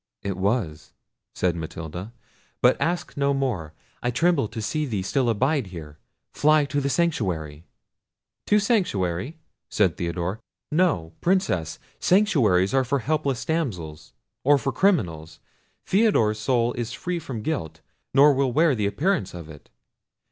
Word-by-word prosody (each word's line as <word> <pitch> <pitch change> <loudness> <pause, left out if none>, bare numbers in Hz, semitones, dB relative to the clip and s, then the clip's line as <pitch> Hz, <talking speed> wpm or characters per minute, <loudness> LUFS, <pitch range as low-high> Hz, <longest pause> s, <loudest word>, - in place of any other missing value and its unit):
"It 100 -2 -2
was," 95 -5 -2 0.4
said 90 -2 0
Matilda; 85 +4 -6 0.5
"but - - +5
ask 175 +1 -1
no 140 0 +1
more; 110 - -2 0.3
I 120 - 0
tremble 145 +1 +2
to 115 +2 -7
see 150 +8 -2
thee 105 -6 -2
still 125 +5 +1
abide 130 +2 +1
here; 75 -5 -10 0.3
fly 155 0 +4
to 145 +1 -1
the 140 - -1
sanctuary." 90 - -1 0.8
"To 210 - +4
sanctuary," 150 - 0 0.3
said 95 -5 +1
Theodore; 85 +4 -3 0.3
"no, 150 - +1
Princess; 130 - 0 0.2
sanctuaries 125 - +3
are 135 -1 +3
for 125 +3 0
helpless 140 -1 -1
damsels, 90 - -3 0.3
or 145 +2 +5
for 135 0 -2
criminals. 90 - 0 0.5
Theodore's 185 - +2
soul 120 +1 +1
is 120 0 -4
free 180 +3 -3
from 130 -9 -6
guilt, 80 - -3 0.3
nor 145 +2 +6
will 135 -1 +1
wear 155 +3 +3
the 105 -5 0
appearance 125 - -1
of 85 -3 -9
it. 75 -2 -13
120 Hz, 140 wpm, -24 LUFS, -, 0.8 s, nor